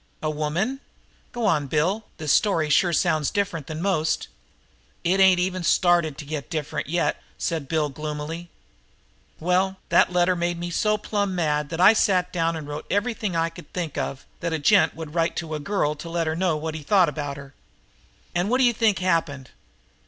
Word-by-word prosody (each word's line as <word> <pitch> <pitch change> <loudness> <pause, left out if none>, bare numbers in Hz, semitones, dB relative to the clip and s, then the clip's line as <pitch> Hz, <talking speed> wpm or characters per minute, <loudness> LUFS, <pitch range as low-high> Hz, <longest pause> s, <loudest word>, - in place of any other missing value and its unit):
"A 155 - 0
woman? 165 - -1 0.5
Go 240 -2 -3
on, 150 -8 +2
Bill. 180 +10 0
This 155 -2 +1
story 165 -7 +2
sure 175 +4 +4
sounds 155 -2 +1
different 175 -8 -2
from 155 0 -5
most." 160 -6 0 0.7
"It 185 +3 +2
ain't 190 -2 +6
even 185 0 -1
started 170 -4 +3
to 145 - -7
get 150 -1 -5
different 155 -4 -3
yet," 175 +2 0 0.2
said 160 -4 -2
Bill 155 -1 +1
gloomily. 150 +4 -5 0.9
"Well, 185 +3 +1
that - - +4
letter 180 0 +3
made 175 0 -1
me 175 0 -5
so 210 +4 +1
plumb 205 -2 -2
mad 150 -4 0
that 165 +1 -5
I 185 +4 +8
sat 180 -4 +2
down 165 -1 0
and 155 -2 -6
wrote 145 0 -6
everything 210 -3 -1
I 165 0 +1
could 165 -3 -14
think 170 -5 -3
of 135 -1 -4
that 170 - -2
a - - +1
gent 155 +1 +4
would 160 -2 -8
say 165 -1 +2
to 165 -2 -4
a 155 - -2
girl 150 -2 0
to 160 +3 -9
let 165 0 -1
her 155 0 -1
know 175 -2 +1
what 155 +1 -4
I 160 - -5
thought 185 +4 +4
about 145 -2 -4
her. 140 -1 -11 0.8
And 175 +3 0
what 250 - +3
d'you 250 -2 +4
think 220 -3 +2
happened?" 165 -7 -1
165 Hz, 190 wpm, -24 LUFS, 150-185 Hz, 0.9 s, I